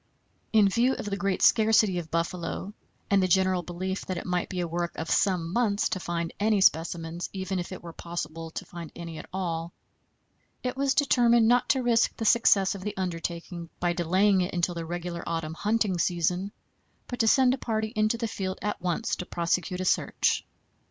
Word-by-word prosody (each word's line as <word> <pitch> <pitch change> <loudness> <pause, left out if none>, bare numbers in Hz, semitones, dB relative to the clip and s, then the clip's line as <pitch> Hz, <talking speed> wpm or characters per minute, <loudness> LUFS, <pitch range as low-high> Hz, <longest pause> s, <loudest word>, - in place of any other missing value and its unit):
In 215 -2 +5
view 235 +6 +2
of - - -6
the 205 -1 -2
great 195 -1 -1
scarcity 215 -4 +4
of 160 -2 -8
buffalo 170 +4 -3 0.4
and 200 -1 +5
the 185 - +2
general 185 0 +3
belief 185 +3 -4
that 185 - -2
it - - -5
might 180 -1 -1
be 185 - -4
a 175 - -1
work 170 0 -3
of 160 - -4
some 180 -4 +1
months 215 -3 +1
to 185 - -2
find 170 -1 -3
any 210 0 +2
specimens, 165 -1 +1
even 190 -1 -3
if 175 - -5
it 185 - -8
were 170 -1 -8
possible 165 -1 -6
to - - -6
find 170 -2 -9
any 165 -2 -7
at - - -10
all, 170 -3 -3 0.9
it 250 0 -2
was 275 0 +1
determined 240 -5 +4
not 245 +1 +3
to 260 -2 +2
risk 235 -1 +2
the 225 - -3
success 205 -4 +4
of 195 - -8
the 210 +1 -5
undertaking 170 -1 -4
by 175 0 +1
delaying 185 +3 +3
it 180 0 -2
until 175 0 +1
the 165 -1 -5
regular 175 0 -4
autumn 165 -1 -3
hunting 205 0 0
season, 180 +3 0 0.5
but 245 - -6
to 225 - +3
send 260 +1 +5
a 265 - -3
party 220 -2 -2
into 215 +2 +2
the 230 0 -2
field 190 -3 -4
at 210 -3 -2
once 180 +6 -1
to 180 - -5
prosecute 180 +2 -1
a - - -2
search. - - +1
185 Hz, 200 wpm, -27 LUFS, 170-215 Hz, 0.9 s, In